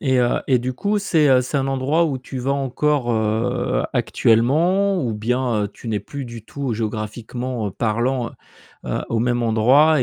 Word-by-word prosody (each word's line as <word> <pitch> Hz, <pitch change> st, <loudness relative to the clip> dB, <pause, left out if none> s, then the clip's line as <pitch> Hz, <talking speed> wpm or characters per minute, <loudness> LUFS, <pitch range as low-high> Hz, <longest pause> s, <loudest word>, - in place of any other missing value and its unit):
Et, 130 Hz, -3 st, +2 dB
heu, 120 Hz, -1 st, +2 dB
et 130 Hz, -2 st, +4 dB
du 125 Hz, +2 st, -3 dB
coup, 205 Hz, +11 st, 0 dB
c'est, 165 Hz, -7 st, +2 dB
heu, 130 Hz, -1 st, +6 dB
c'est 125 Hz, +3 st, -3 dB
un 135 Hz, -1 st, +1 dB
endroit 135 Hz, +5 st, +1 dB
où 140 Hz, -5 st, -1 dB
tu 130 Hz, +1 st, -7 dB
vas 130 Hz, +2 st, 0 dB
encore, 140 Hz, -1 st, 0 dB
heu, 110 Hz, 0 st, 0 dB
actuellement? 170 Hz, -, +2 dB
Ou 120 Hz, -4 st, -1 dB
bien, 115 Hz, 0 st, 0 dB
heu, -, -, -3 dB
tu 115 Hz, -, -10 dB
n'es 105 Hz, -2 st, -1 dB
plus 140 Hz, +7 st, -7 dB
du 115 Hz, -2 st, -9 dB
tout 135 Hz, -2 st, -4 dB
géographiquement, 110 Hz, +2 st, -4 dB
heu, -, -, -6 dB
parlant 120 Hz, +4 st, -1 dB
heu, -, -, -14 dB
heu, -, -, -2 dB
au 115 Hz, -, 0 dB
même 120 Hz, +1 st, +1 dB
endroit 130 Hz, +7 st, +4 dB
125 Hz, 190 wpm, -21 LUFS, 115-140 Hz, -, heu